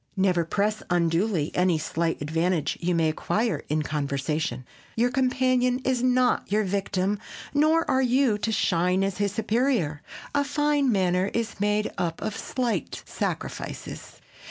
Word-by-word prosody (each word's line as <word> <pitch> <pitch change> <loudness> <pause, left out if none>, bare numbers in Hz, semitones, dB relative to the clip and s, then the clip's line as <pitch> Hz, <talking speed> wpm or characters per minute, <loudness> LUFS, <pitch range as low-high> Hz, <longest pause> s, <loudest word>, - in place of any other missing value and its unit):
Never 185 -3 +3
press 210 +5 0
unduly 170 -1 +1
any 180 -2 +2
slight 165 0 -2
advantage 165 +1 0
you 175 0 +1
may 165 -1 +3
acquire 165 +2 -1
in 155 +1 +1
conversation. 140 -3 -2 0.3
Your 240 +2 +2
companion 255 -1 +2
is 255 -2 +1
not 255 -4 +2
your 215 +1 +3
victim 195 0 -1 0.3
nor 310 +3 +3
are 265 0 +2
you 250 -3 +2
to 225 - -1
shine 180 -2 +2
as 195 0 -2
his 200 -1 +1
superior. 220 - 0 0.3
A 285 0 +2
fine 290 -1 +1
manner 185 -1 +2
is 230 -2 -2
made 210 +1 +1
up 165 -2 -1
of 215 - -3
many - - -6
slight 235 - -2
sacrifices. - - -5
200 Hz, 145 wpm, -26 LUFS, 170-245 Hz, 0.3 s, Never